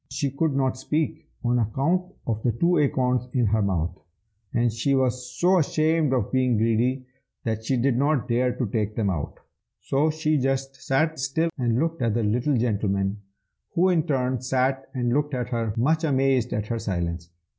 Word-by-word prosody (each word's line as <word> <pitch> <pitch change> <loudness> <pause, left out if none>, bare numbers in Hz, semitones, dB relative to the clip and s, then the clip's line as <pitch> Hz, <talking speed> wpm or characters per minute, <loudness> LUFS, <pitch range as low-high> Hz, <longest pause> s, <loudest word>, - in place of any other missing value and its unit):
She 140 +1 -2
could 145 +1 0
not 130 -1 +1
speak, 155 +3 -2 0.2
on 120 0 +2
account 135 - +1 0.2
of 110 -2 -2
the 120 - +1
two 170 +9 +2
acorns 125 -3 +1
in 125 -3 +2
her 110 +1 +2
mouth; 90 -4 -1 0.5
and 120 -1 +1
she 135 +5 +1
was 125 -1 0
so 180 +3 +4
ashamed 155 -1 +1
of 125 -6 0
being 130 -3 +2
greedy, 120 +4 +1 0.4
that 110 -1 -2
she 130 +3 0
did 120 0 +2
not 140 -3 +1
dare 125 +1 +2
to 125 +1 -2
take 105 0 -2
them 105 -4 +1
out. 80 -5 -4 0.4
So 145 +3 +1
she 155 -1 +1
just 135 +1 -1
sat 155 +3 0
still 160 +5 0
and 120 -4 0
looked 165 +2 -1
at 115 -3 +1
the 120 - +1
little 125 +6 +1
gentleman, 100 -3 0 0.5
who 180 +2 +4
in 175 -3 +3
turn 130 -3 0
sat 130 +1 0
and 120 -2 0
looked 145 0 0
at 125 -1 -3
her, 115 -3 -1
much 155 +7 +2
amazed 135 -4 +2
at 105 - -1
her 115 -1 -1
silence. 85 -4 -3
125 Hz, 185 wpm, -25 LUFS, 115-140 Hz, 0.5 s, so